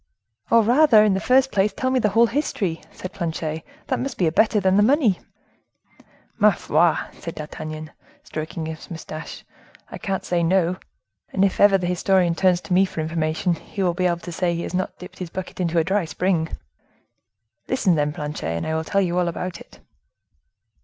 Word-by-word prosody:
"Oh! 230 -1 +5
rather, 240 -1 +6
in 210 -2 +3
the 190 - 0
first 265 +4 +3
place, 200 +1 +2
tell 260 +4 -1
me 260 - +2
the 215 - +2
whole 225 +4 +5
history," 220 - -2
said 185 - -8
Planchet; 160 -2 -3 0.2
"that - - -1
must 275 - -4
be 175 - +2
better 215 +4 +3
than 190 -1 +2
the 205 - +5
money." 240 - +3 1.2
"Ma - - +7
foi!" - - +2 0.2
said - - -7
D'Artagnan, 155 0 -7 0.3
stroking 160 +2 -5
his 160 +3 -7
mustache, 160 -2 -8 0.5
"I - - -7
can't 195 -2 -3
say 175 -1 0
no; 180 +1 +2 0.5
and 195 0 +3
if 195 - -1
ever 200 -1 +6
the 180 - -3
historian 180 0 +2
turns 180 +1 +2
to 180 - -3
me 185 +2 +5
for 185 - -4
information, 160 +2 0
he 195 +4 -5
will 175 -2 +2
be 180 +1 +1
able 170 -1 0
to 175 - -7
say 175 0 0
he 170 - -3
has - - -6
not 185 +1 -2
dipped 180 - -12
his 180 -2 -5
bucket 185 +2 -7
into 170 -2 0
a 165 - +4
dry 195 +1 0
spring. 165 +1 0 1.2
Listen, 225 -8 +2
then, 150 -2 +1
Planchet, 150 - -4
I 160 - -2
will 160 0 -1
tell 200 +4 +1
you 180 -1 0
all 175 - +1
about 175 +1 -4
it." - - -16
180 Hz, 195 wpm, -23 LUFS, 165-200 Hz, 1.2 s, Ma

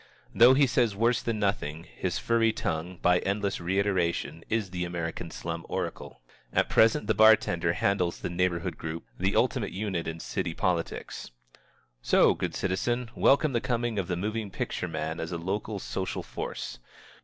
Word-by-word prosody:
Though 120 +3 +7
he 140 +1 +5
says 120 -5 +1
worse 115 +3 +2
than 115 -2 -2
nothing, 85 -6 -1
his - - -3
furry 115 -1 +2
tongue, 85 -2 -3
by 90 0 +5
endless 100 +1 -1
reiteration, 90 -3 0
is 110 -4 -1
the 90 -1 -2
American 85 -1 -4
slum 85 0 -5
oracle. - - -4 0.3
At - - +2
the - - -6
present 110 -1 +4
the - - +2
bar 110 +1 +8
tender 85 -4 -1
handles 90 -3 0
the - - -3
neighborhood 85 -1 -1
group, 80 +1 -5
the 95 +2 +1
ultimate 125 -4 +1
unit 95 -4 -2
in 80 0 -4
city 85 0 -3
politics. 85 -2 -2 0.7
So, - - +5
good - - -3
citizen, 120 +5 -1
welcome 140 +1 +3
the 120 - +1
coming 120 -4 -1
of 95 - -2
the 90 - -1
moving 105 +2 -2
picture - - -3
man 80 +1 -3
as 80 - -4
a 85 - -2
local 100 +5 -3
social 95 0 -4
force. - - -6
95 Hz, 170 wpm, -28 LUFS, 85-110 Hz, 0.7 s, bar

